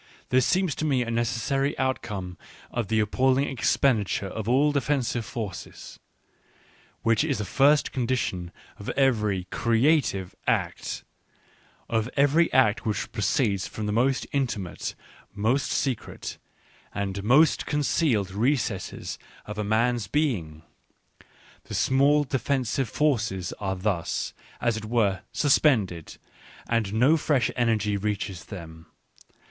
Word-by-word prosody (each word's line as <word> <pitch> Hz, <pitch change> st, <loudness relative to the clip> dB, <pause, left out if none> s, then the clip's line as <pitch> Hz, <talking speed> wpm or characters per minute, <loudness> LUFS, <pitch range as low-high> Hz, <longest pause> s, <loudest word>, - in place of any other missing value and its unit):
This 130 Hz, 0 st, +3 dB
seems 185 Hz, -4 st, +2 dB
to -, -, -5 dB
me 135 Hz, -5 st, +2 dB
a 115 Hz, -, -4 dB
necessary 120 Hz, +4 st, 0 dB
outcome 105 Hz, -9 st, -2 dB, 0.4 s
of 120 Hz, -4 st, -2 dB
the 110 Hz, +2 st, +1 dB
appalling 130 Hz, +6 st, +2 dB
expenditure 115 Hz, -6 st, +1 dB
of 110 Hz, +3 st, -4 dB
all 140 Hz, +4 st, +4 dB
defensive 135 Hz, -4 st, 0 dB
forces, 105 Hz, 0 st, -7 dB, 1.0 s
which 115 Hz, +4 st, +3 dB
is 145 Hz, -4 st, 0 dB
the 105 Hz, -, -3 dB
first 145 Hz, +6 st, +3 dB
condition 115 Hz, -9 st, -2 dB, 0.3 s
of 100 Hz, -, -6 dB
every 105 Hz, -8 st, +2 dB
creative 115 Hz, -, +2 dB
act, -, -, -1 dB, 0.8 s
of 115 Hz, +1 st, 0 dB
every 145 Hz, +5 st, +4 dB
act 125 Hz, -5 st, +3 dB
which 100 Hz, -5 st, -2 dB
proceeds 100 Hz, -, 0 dB
from 110 Hz, -, -5 dB
the 105 Hz, -, -1 dB
most 125 Hz, +5 st, +1 dB
intimate, 120 Hz, -, -2 dB, 0.4 s
most 115 Hz, +7 st, +1 dB
secret, 130 Hz, -5 st, -3 dB, 0.6 s
and 100 Hz, -1 st, -3 dB
most 135 Hz, +9 st, +4 dB
concealed 140 Hz, -, +1 dB
recesses 115 Hz, -1 st, -1 dB, 0.3 s
of 105 Hz, 0 st, -6 dB
a -, -, 0 dB
man's 115 Hz, +1 st, +1 dB
being. 90 Hz, -, -1 dB, 1.0 s
The -, -, -6 dB
small 140 Hz, +3 st, +3 dB
defensive 135 Hz, -2 st, -1 dB
forces 115 Hz, -, 0 dB
are 95 Hz, -2 st, -2 dB
thus, 90 Hz, -3 st, -2 dB, 0.3 s
as 120 Hz, -2 st, +1 dB
it 110 Hz, -, -6 dB
were, 105 Hz, -5 st, +1 dB
suspended, 110 Hz, -, +2 dB, 0.5 s
and 115 Hz, -4 st, 0 dB
no 130 Hz, +9 st, +4 dB
fresh 145 Hz, -4 st, +1 dB
energy 110 Hz, -4 st, +1 dB
reaches 100 Hz, -4 st, -3 dB
them. 80 Hz, -4 st, -10 dB
115 Hz, 120 wpm, -26 LUFS, 100-135 Hz, 1.0 s, all